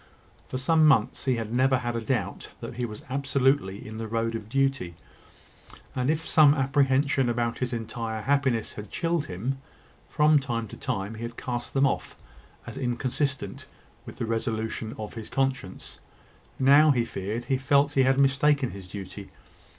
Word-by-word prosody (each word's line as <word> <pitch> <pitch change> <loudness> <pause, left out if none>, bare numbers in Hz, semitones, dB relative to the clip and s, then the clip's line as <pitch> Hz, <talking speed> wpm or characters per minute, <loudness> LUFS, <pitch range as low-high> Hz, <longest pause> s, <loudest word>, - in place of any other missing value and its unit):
For 130 - -4
some 155 +4 +4
months, 130 -5 +2
he 130 -2 +2
had 115 -1 -4
never 130 +1 +3
had 120 -1 -3
a 115 - -1
doubt 110 - -2
that - - -7
he 125 -1 -1
was 105 -1 -9
absolutely 135 -6 0
in 110 0 -7
the 115 - -4
road 115 +1 -1
of 110 -2 -6
duty; 135 -9 0 1.0
and, 125 +1 0
if 160 +1 0
some 150 -2 +6
apprehension 135 -1 +2
about 115 0 -1
his 125 -1 -1
entire 115 -1 -4
happiness 130 -3 +1
had 105 -1 -8
chilled 165 -3 -1
him, 120 +10 -3 0.5
from 150 0 +4
time 120 -4 -3
to - - -9
time, 95 +3 -3
he 110 - -9
had 115 0 -6
cast 120 +1 -4
them 135 +1 +4
off, 135 - -1 0.5
as - - -8
inconsistent 130 -2 -2 0.4
with - - -8
the - - -3
resolution 110 0 -2
of 110 -1 -6
his 110 -2 -8
conscience. 135 -8 -3 0.6
Now 140 +3 +6
he 120 -5 +3
feared, 110 +3 -4
he 130 +1 0
felt 140 +2 +3
he 135 - +4
had 130 +1 +3
mistaken 140 0 +3
his 95 -2 -9
duty. 100 +1 -8
125 Hz, 170 wpm, -27 LUFS, 115-135 Hz, 1.0 s, some